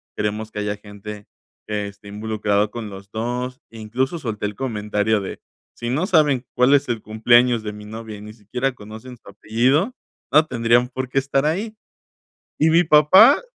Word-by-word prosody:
queremos 105 +1 -2
que - - -5
haya 105 0 -2
gente 105 0 -10 0.4
que 105 -1 -2
esté 100 +1 -13
involucrado 105 0 -1
con 115 -2 -6
los 100 0 -11
2". 125 +3 -3
Incluso 115 +7 -3
solté 110 -7 -4
el 105 - -7
comentario 105 -3 -1
de, 95 - -7 0.4
si 120 - -5
no 155 +8 0
saben 150 - +3
cuál 125 +3 +4
es 145 0 +3
el 115 -2 -1
cumpleaños 120 +2 +3
de 105 -1 -5
mi 105 0 -10
novia 110 0 -8
y - - -12
ni 105 +1 -10
siquiera 120 +5 -3
conocen 110 +3 -11
su - - -16
apellido, 125 - +1 0.4
no 155 +3 +5
tendrían 120 -1 +2
por 130 +1 -5
qué 135 - +2
estar 135 +1 0
ahí". 200 +8 -1 0.8
Y 155 - +4
mi 170 +2 +5
papá 175 - +7
115 Hz, 175 wpm, -21 LUFS, 105-135 Hz, 0.8 s, papá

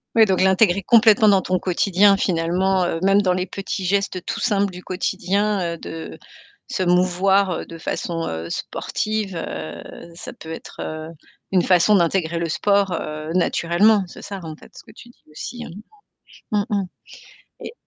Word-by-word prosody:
Oui 225 - +7
donc 190 -3 +1
l'intégrer 190 0 +3
complètement 220 0 +5
dans 195 -2 +5
ton 185 0 -1
quotidien 195 +2 +3
finalement, 185 +1 +1
heu, 165 -1 -2
même 195 +1 +4
dans 185 -2 +2
les 180 0 -1
petits 195 +1 -5
gestes 190 -1 -1
tout 225 0 -3
simples 200 -4 +1
du 180 0 -10
quotidien, 190 0 -1
heu, - - -7
de 160 0 -8 0.5
se 185 - -1
mouvoir 185 +1 +2
de 165 - -9
façon, 165 0 -3
heu, 80 +1 -5
sportive, 215 - -3
heu, 85 - -6 0.3
ça 170 - -8
peut 160 - -11
être, 160 - -9
heu, 155 0 -6 0.4
une 185 -2 +3
façon 185 +3 +4
d'intégrer 170 -1 0
le 170 - -1
sport, 200 +3 +1
heu, 155 +1 -5
naturellement, 185 +4 +3
c'est - - -12
ça, 200 -1 -7
en 160 -1 -7
fait, - - -17
ce - - -13
que - - -15
tu 240 - -14
dis 240 - -23
aussi, 240 +10 -7
hein? - - -9 0.8
Mmh 210 -1 +2
mh. 200 -2 +1 0.8
Et - - -7
185 Hz, 170 wpm, -21 LUFS, 170-200 Hz, 0.8 s, Oui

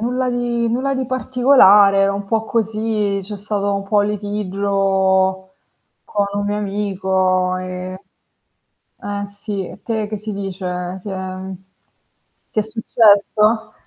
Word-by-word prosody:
nulla 250 +2 -1
di 240 -1 -1
nulla 260 +4 0
di 260 -1 -2
particolare, 225 -7 +5
un 200 0 -2
po' 220 +2 -1
così, 215 -2 -1
c'è 205 +2 -7
stato 205 0 -2
un 200 0 -2
po' 205 +1 +1
u - - +6
litigio 195 -2 0 0.5
con 205 -1 -1
un 205 0 -2
mio 205 - -1
amico 190 -2 0
e 185 +1 -6 1.0
eh 205 0 -4
sì, 200 -1 -5
e - - -12
te 220 -2 -2
che 215 - -4
si 215 +1 -5
dice? 185 -2 -4
Ti 205 - -9
è 190 0 -5 1.0
ti - - -3
è - - 0
successo? 220 0 +2
205 Hz, 135 wpm, -19 LUFS, 190-220 Hz, 1.0 s, u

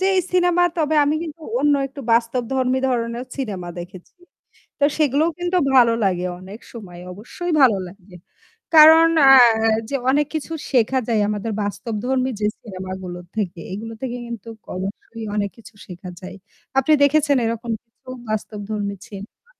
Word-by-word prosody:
যে 380 - +2
এই - - +4
cinema 355 -1 +3
তবে 315 -1 0
আমি 295 +2 +1
কিন্তু 325 -1 -8 0.2
অন্য 290 0 +3
একটু 280 +1 -10
বাস্তবধর্মী 250 +2 +1
ধরনেরও 235 0 -2
cinema 200 -10 -4
দেখেছি। 180 +1 -10 0.7
তো - - 0
সেগুলোও 300 +2 +2
কিন্তু 355 +1 0 0.2
ভালো 235 -2 +6
লাগে 180 -2 0
অনেক 195 +5 -10
সময়। 190 -7 -10
অবশ্যই 245 - -6
ভালো 240 -7 +5
লাগে। 185 0 -16 0.6
কারণ 320 +1 +9 0.2
আ 270 - +9 0.6
যে 280 - -2
অনেক 290 +2 +3
কিছু 315 +1 -4 0.2
শেখা 260 0 +2
যায় 225 -3 +1
আমাদের 210 +1 -3
বাস্তবধর্মী 230 +6 -2
যে 210 - 0 0.2
cinema 190 -3 -8
গুলো 175 -1 -6 0.2
থেকে। 190 -5 -3
এগুলো 225 +3 -6
থেকে 245 -1 -4
কিন্তু 230 -1 -8 0.3
অবশ্যই 200 +4 -6
অনেক 205 -1 0
কিছু 230 - -15
শেখা 180 0 -9
যায়। 185 +1 -9 0.4
আপনি 290 +4 +2
দেখেছেন 285 -1 +3
এরকম 230 +1 -3
কিছু 235 +2 -19 0.2
বাস্তবধর্মী 210 -1 -4
cinema? 200 - -12
230 Hz, 150 wpm, -21 LUFS, 200-280 Hz, 0.7 s, কারণ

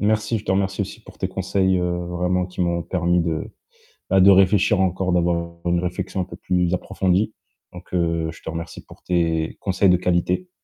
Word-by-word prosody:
Merci, 110 +2 +1
je 105 - -12
te - - -2
remercie 95 0 0
aussi - - -4
pour - - -16
tes - - -1
conseils, 95 -1 +1
heu, 90 0 -1
vraiment 90 +1 0
qui 90 0 -8
m'ont 85 -1 0
permis 90 -1 +1
de, 80 -2 -3 0.6
bah, 95 - +4
de 95 +2 +8
réfléchir 95 +1 +4
encore, 95 0 0
d'avoir 85 -1 0
une 85 0 +2
réflexion 90 +1 -3
un - - 0
peu 95 - -11
plus 90 -1 0
approfondie. 95 +3 0 0.4
Donc, 90 0 -12
heu, 85 -2 0
je - - -16
te - - -7
remercie 80 0 -6
pour - - -16
tes 85 -2 0
conseils 95 0 +2
de 90 - +5
qualité. 90 - 0
90 Hz, 200 wpm, -22 LUFS, 85-95 Hz, 0.6 s, de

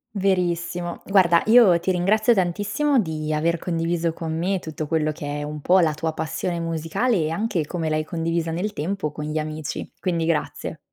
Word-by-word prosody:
Verissimo. 175 -3 -1
Guarda 180 -4 +4
io 220 -6 +6
ti 175 - -3
ringrazio 210 +6 +3
tantissimo 205 +9 +1
di 155 -4 -2
aver 165 +2 +1
condiviso 165 -1 -1
con 160 -1 -4
me 185 +3 0
tutto 155 -2 -5
quello 155 0 0
che 145 -2 -5
è - - -4
un 150 0 -6
po' 185 +5 +4
la 160 -3 +3
tua 160 +1 -2
passione 160 +2 -3
musicale 165 +9 0
e 155 -5 +1
anche 170 -2 -1
come 165 0 -3
l'hai 155 0 0
condivisa 165 0 -2
nel 190 +6 -2
tempo 160 0 -2
con 150 - -6
gli 155 +1 -3
amici. 155 -1 -4
Quindi 170 -3 0
grazie. 160 0 -2
170 Hz, 180 wpm, -23 LUFS, 155-185 Hz, -, io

